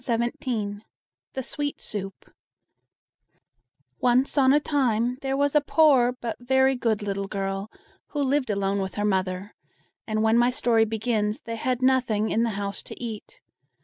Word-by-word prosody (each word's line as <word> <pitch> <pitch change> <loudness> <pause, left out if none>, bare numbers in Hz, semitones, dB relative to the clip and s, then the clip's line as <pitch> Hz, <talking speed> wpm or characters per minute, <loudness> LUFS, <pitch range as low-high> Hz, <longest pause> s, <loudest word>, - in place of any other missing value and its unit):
THE 230 0 -4
SWEET 290 +3 -4
SOUP 195 -2 -7 1.7
Once 250 +2 +2
on 265 -2 +5
a 290 - +5
time 250 -4 0
there 270 0 -1
was 285 0 +2
a 300 - +5
poor 280 -5 +4
but 240 -2 -5
very 265 +2 +3
good 225 -4 0
little 200 -1 -2
girl, 195 0 -3 0.4
who 290 -2 -2
lived 275 -2 +1
alone 200 -1 0
with 190 0 -4
her 205 - -1
mother, 190 0 -1 0.5
and 215 -1 0
when 225 +1 +4
my 240 +1 +4
story 235 -3 +2
begins, 220 +1 -1
they 230 - -5
had 250 +2 -1
nothing 250 -5 +2
in 225 - +2
the 235 - +2
house 200 -1 -4
to - - -11
eat. 235 - -7
235 Hz, 150 wpm, -25 LUFS, 210-260 Hz, 1.7 s, on